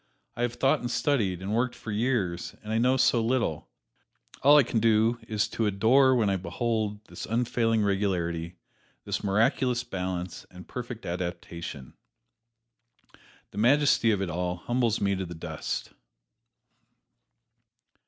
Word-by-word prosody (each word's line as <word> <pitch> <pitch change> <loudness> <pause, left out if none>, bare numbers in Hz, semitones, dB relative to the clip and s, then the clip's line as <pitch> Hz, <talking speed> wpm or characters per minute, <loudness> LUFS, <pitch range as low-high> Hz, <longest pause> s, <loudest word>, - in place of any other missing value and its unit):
I - - -5
have 120 0 -1
thought 135 +4 +2
and 120 - -4
studied, 115 - 0
and 100 +2 -3
worked 120 +2 0
for 110 - -7
years, 105 -6 -1
and 105 +1 -4
I 110 - +2
know 130 +2 +3
so 120 -2 +3
little 115 - -1 0.7
all 145 +2 +7
I 145 - +7
can 115 - -1
do 115 +1 +3
is 105 -1 0
to 110 - -1
adore 125 +7 +4
when 115 -4 +2
I 100 -1 +1
behold 110 +1 -2
this - - -8
unfailing 115 -1 +1
regularity, 90 -4 -1 0.5
this - - -3
miraculous 115 +5 +1
balance 90 -5 -4
and 90 0 -13
perfect 120 -2 -7
adaptation. 85 -5 -5 1.6
The - - -6
majesty 130 0 +4
of 100 -3 +1
it 95 - -3
all 90 +1 -2
humbles 120 +4 0
me 100 -1 +1
to 95 - -3
the 85 - -8
dust." 80 -1 -5
110 Hz, 145 wpm, -27 LUFS, 95-120 Hz, 1.6 s, all